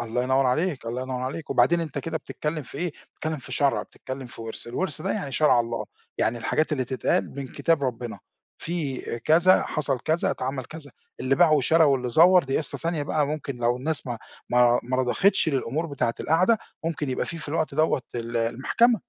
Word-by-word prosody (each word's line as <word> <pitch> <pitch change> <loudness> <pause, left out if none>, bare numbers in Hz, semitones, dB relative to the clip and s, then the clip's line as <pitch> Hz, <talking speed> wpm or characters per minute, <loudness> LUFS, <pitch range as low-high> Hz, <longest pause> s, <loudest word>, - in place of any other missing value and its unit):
الله 120 +1 -1
ينوّر 130 +1 +2
عليك، 150 0 0
الله 120 +2 -3
ينوّر 130 -1 -4
عليك، 140 +5 -5
وبعدين 170 0 +4
أنت 155 -4 -4
كده 165 +3 -3
بتتكلم 150 0 -4
في 140 - -10
إيه، 175 -2 -2 0.2
بتتكلم 155 0 -3
في 130 -2 -10
شرع، 140 +1 +2
بتتكلم 130 0 -8
في 120 - -12
ورث، 115 0 -6
الورث 150 +5 -3
ده - - -1
يعني 145 -11 -4
شرع 140 -3 +4
الله، 115 0 -3 0.3
يعني 120 +1 +1
الحاجات 155 +7 0
اللي 130 -4 0
تتقال 130 +1 -1
من 140 -1 -4
كتاب 165 -4 +1
ربنا، 120 -4 -3 0.4
في 155 -6 -3
آآ، 120 - -4
كذا 170 +9 +5
حصل 140 -4 -1
كذا 160 +5 +1
اتعمل 130 0 -3
كذا، 150 0 -9 0.3
اللي 130 +1 +2
باع 170 -1 +5
وشرا 155 +3 +4
واللي 135 -4 +2
زوّر 175 +4 +6
دي 135 - -1
قصة 155 - -3
تانية 165 -2 -1
بقى، 145 0 0
ممكن 145 -3 -4
لو 120 +1 +1
الناس 150 +2 -2
ما 120 -2 -4 0.3
ما 120 0 +5
ما 130 +2 -2
رضختش 160 +9 +2
للأمور 140 +3 -1
بتاعة 140 -6 -1
القعدة 180 +8 +3 0.3
ممكن 155 -4 -2
يبقى 125 - -1
فيه 165 - -5
في 150 - -8
الوقت 155 -1 -1
دَوّة 155 -3 +2
ال 120 0 -3
المحكمة. 135 - +2
140 Hz, 200 wpm, -25 LUFS, 125-160 Hz, 0.4 s, زوّر